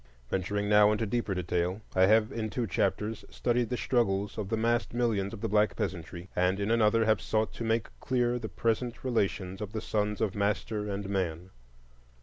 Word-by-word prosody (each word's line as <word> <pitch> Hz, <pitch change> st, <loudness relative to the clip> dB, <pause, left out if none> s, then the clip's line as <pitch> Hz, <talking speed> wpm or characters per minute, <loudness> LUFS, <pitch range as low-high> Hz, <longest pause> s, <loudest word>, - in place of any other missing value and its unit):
Venturing 100 Hz, +2 st, -1 dB
now 105 Hz, 0 st, +6 dB
into 110 Hz, +1 st, 0 dB
deeper 110 Hz, -2 st, -1 dB
detail, 90 Hz, +2 st, -1 dB, 0.2 s
I 95 Hz, 0 st, +5 dB
have 110 Hz, +1 st, +4 dB
in 110 Hz, -1 st, -3 dB
two 120 Hz, +2 st, -2 dB
chapters 105 Hz, +3 st, -1 dB
studied 120 Hz, -1 st, 0 dB
the 125 Hz, -, -1 dB
struggles 100 Hz, -6 st, 0 dB
of 105 Hz, -3 st, -4 dB
the 115 Hz, -, 0 dB
massed 120 Hz, +1 st, 0 dB
millions 110 Hz, -5 st, +1 dB
of 110 Hz, -, -8 dB
the 115 Hz, -, 0 dB
black 105 Hz, 0 st, +2 dB
peasantry, 85 Hz, 0 st, -4 dB
and 90 Hz, +2 st, +2 dB
in 100 Hz, +2 st, 0 dB
another 115 Hz, 0 st, +4 dB
have 110 Hz, -2 st, +3 dB
sought 110 Hz, 0 st, 0 dB
to -, -, -5 dB
make 115 Hz, 0 st, +1 dB
clear 125 Hz, -1 st, 0 dB
the -, -, -5 dB
present 115 Hz, +1 st, -1 dB
relations 100 Hz, -6 st, -1 dB
of 105 Hz, 0 st, -5 dB
the 110 Hz, -, -2 dB
sons 105 Hz, -1 st, -1 dB
of 110 Hz, -4 st, 0 dB
master 105 Hz, +1 st, -1 dB
and 100 Hz, 0 st, -3 dB
man. 90 Hz, -2 st, -2 dB
105 Hz, 190 wpm, -29 LUFS, 95-115 Hz, 0.2 s, now